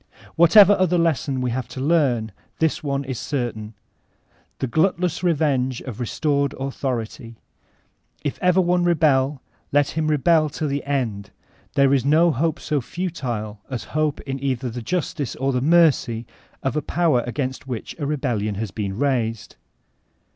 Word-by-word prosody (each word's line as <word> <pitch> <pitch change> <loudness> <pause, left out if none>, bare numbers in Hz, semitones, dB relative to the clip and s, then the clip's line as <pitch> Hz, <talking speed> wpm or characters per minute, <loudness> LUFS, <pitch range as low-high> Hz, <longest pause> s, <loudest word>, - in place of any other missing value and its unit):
Whatever 190 +5 +7
other 180 -1 +3
lesson 150 -5 0
we 125 -1 -1
have 125 0 -3
to 125 - -8
leani, 130 -7 +1 0.3
this 160 -1 0
one 140 -1 -1
is 130 -3 -5
certain: 115 -6 -4 0.8
the - - -2
glutless 175 +6 +1
revenge 140 -7 +1
of 125 -4 -8
restored 140 +3 0
Authority. 125 -3 -4 0.9
If 145 - -3
ever 180 0 +4
one 180 -1 +2
rebek, 150 -5 +2 0.3
let 145 0 +3
him 160 -1 -1
rebel 155 +1 +3
to 155 - -1
the 140 -1 -2
end;* 115 -8 -2 0.5
there 140 0 +4
is 135 -3 +2
no 160 +5 +4
hope 160 +4 -1
so 150 -3 -1
futile 120 - -4
as 130 -3 -4
hope 155 -1 0
in 135 0 -5
either 130 -2 -1
the 120 +1 -5
justice 145 -1 -2
or 135 +1 0
the 125 - 0
mercy 140 -7 +3 0.4
of 135 +1 -1
a 150 - +1
power 160 -6 +1
against 130 +1 -4
which 120 -4 -5
a 145 - -2
rebellion 120 -8 -1
has 105 -1 -4
been, 100 -1 -4
raised. 120 -5 -1
140 Hz, 155 wpm, -22 LUFS, 120-155 Hz, 0.9 s, Whatever